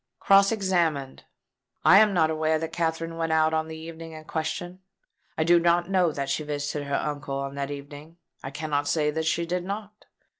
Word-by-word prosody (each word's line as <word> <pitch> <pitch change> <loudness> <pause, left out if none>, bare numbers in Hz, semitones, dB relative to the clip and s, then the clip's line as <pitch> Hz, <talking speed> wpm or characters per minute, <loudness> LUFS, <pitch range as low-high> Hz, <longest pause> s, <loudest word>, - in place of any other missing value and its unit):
Cross 195 +1 +5
examined: 170 -10 -1 0.6
"I 195 - +8
am 215 -1 +5
not 160 -4 +2
aware 155 0 +1
that 160 0 -5
Katherine 165 0 -2
went 165 -1 -1
out 160 0 +3
on 160 0 0
the 160 0 -7
evening 165 0 -9
in 155 0 -9
question. 165 +3 -4 0.6
I 160 - +2
do 170 +1 +5
not 175 +2 +2
know 180 -4 +3
that 140 -2 -3
she 140 +3 -1
visited 145 0 -3
her 140 - -1
uncle 145 -2 -3
on 140 0 -4
that 140 0 -4
evening. 145 +3 -9 0.3
I 135 - -4
cannot 145 0 -2
say 150 -1 +1
that 160 +1 -2
she 170 +1 +1
did 175 +1 -2
not. 205 +2 -7
160 Hz, 195 wpm, -26 LUFS, 150-175 Hz, 0.6 s, I